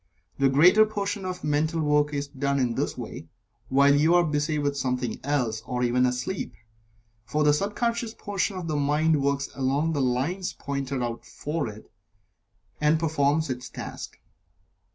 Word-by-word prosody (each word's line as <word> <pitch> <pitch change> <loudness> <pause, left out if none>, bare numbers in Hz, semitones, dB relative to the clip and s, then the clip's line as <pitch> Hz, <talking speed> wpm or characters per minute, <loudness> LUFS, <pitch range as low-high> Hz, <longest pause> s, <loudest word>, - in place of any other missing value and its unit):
The 135 -1 +4
greater 175 +10 +6
portion 205 -2 -3
of 185 -1 -5
mental 155 +2 0
work 150 -1 +2
is 145 -1 -2
done 140 0 -1
in 125 -3 +1
this - - -2
way, 80 - -7 0.4
while 140 +1 +5
you 155 +4 +4
are 175 - +5
busy 150 0 0
with 145 -1 0
something 125 -3 -2
else, 125 -6 0
or 125 +2 -2
even 125 +1 +3
asleep, 125 +9 -3 0.7
for 150 +8 0
the 150 0 +5
sub 200 +7 -1
conscious 235 -1 -1
portion 200 -1 -2
of 175 -2 -5
the 155 - -1
mind 150 +1 +2
works 140 0 0
along 140 +4 0
the 145 - 0
lines 135 +9 -1
pointed 140 -2 -3
out 120 -1 -4
for 150 -2 -4
it, 105 0 -12 0.9
and 155 +1 +3
performs 155 -2 +1
its 125 0 -5
task. - - -7
145 Hz, 165 wpm, -26 LUFS, 130-160 Hz, 0.9 s, greater